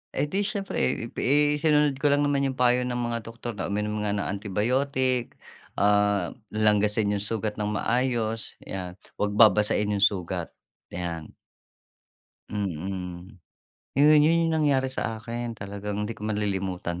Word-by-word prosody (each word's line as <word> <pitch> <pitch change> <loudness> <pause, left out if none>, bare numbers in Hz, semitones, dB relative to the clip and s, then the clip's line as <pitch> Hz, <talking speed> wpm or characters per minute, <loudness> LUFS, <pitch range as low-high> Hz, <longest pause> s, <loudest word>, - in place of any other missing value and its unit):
Edi 190 +7 0
siyempre 200 -2 -4
eh, - - +2 0.3
eh, 145 +2 +3
sinunod 150 -3 +3
ko 145 - +2
lang 145 0 +3
naman 140 -1 +1
'yong 130 - -3
payo 125 0 +3
ng 125 - -2
mga 120 -1 -1
doktor 115 +1 -6
na 100 - -4
uminom 105 +1 -2
nga 105 -1 -1
ng 100 - -1
antibiotic, 125 +5 -1 0.4
ah, 105 -2 +2 0.2
langgasin 105 0 +3
'yong 100 - 0
sugat 110 0 -3
ng 105 - 0
maayos, 115 -1 -1
'yan. 90 -2 -6 0.2
'Wag 105 0 0
babasain 105 -1 +4
'yong 100 - 0
sugat, 95 -3 0 0.3
'yan. 85 -3 -5 1.2
Mm. 95 0 -5 0.6
'Yon, 145 +3 +6
'yon 155 +3 +4
'yong - - 0
nangyari 140 -4 +2
sa 115 -3 -3
akin. 120 +1 -4
Talagang 100 0 -5
hindi 105 +2 -3
ko 105 - -6
malilimutan, 95 -4 -2
105 Hz, 145 wpm, -26 LUFS, 100-130 Hz, 1.2 s, Yon